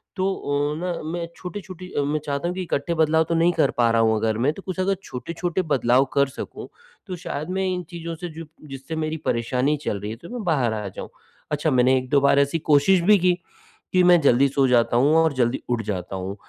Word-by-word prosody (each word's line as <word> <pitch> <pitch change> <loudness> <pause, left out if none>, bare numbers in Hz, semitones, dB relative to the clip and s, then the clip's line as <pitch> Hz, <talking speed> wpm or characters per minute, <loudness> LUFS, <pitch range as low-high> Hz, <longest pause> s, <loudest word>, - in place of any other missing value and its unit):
तो 190 -1 -1
ओ 145 -3 -1
न 180 -2 -2
मैं 170 -1 -3
छोटी-छोटी 185 -1 -8
अ, - - 0
मैं 150 +2 -1
चाहता 140 +3 -2
हूँ 180 - -3
कि 190 - -3
इकट्ठे 165 -1 -2
बदलाव 160 0 +3
तो 170 - +1
नहीं 170 +2 +3
कर 155 -5 +2
पा 120 -1 +4
रहा 115 0 +3
हूँ 110 -1 +3
अगर 110 0 0
मैं 135 +6 +1
तो 195 - -10
कुछ 185 -2 -5
अगर 195 +1 +1
छोटे-छोटे 170 +7 -3
बदलाव 125 +1 +3
कर 140 0 +3
सकूँ, 135 - -8 0.4
तो 185 - -4
शायद 155 -2 -5
मैं 190 - 0
इन 180 0 -3
चीज़ों 170 -1 -6
से 175 +2 -6
जो 165 +1 -9 0.2
जिससे 135 +4 -7
मेरी 160 0 -2
परेशानी 125 +5 0
चल 100 - -1
रही 105 +1 -4
है - - -5
उससे 170 - -11
मैं 240 - -4
बाहर 135 - +1
आ 105 -2 -4
जाऊँ। - - -8 0.4
अच्छा 150 +1 0
मैंने 130 0 +4
1-2 130 +2 +1
बार 140 0 +4
ऐसी 140 +4 +1
कोशिश 160 +6 +5
भी 205 +4 +5
की, 180 0 +3 0.6
कि 185 - +5
मैं 175 -1 +6
जल्दी 140 -1 +4
सो 135 0 +2
जाता 120 -1 +3
हूँ 145 +5 +4
और 160 -2 +3
जल्दी 125 -1 0
उठ 120 -2 0
जाता 95 -2 -4
हूँ। 95 +1 -5
145 Hz, 235 wpm, -23 LUFS, 125-170 Hz, 0.6 s, मैं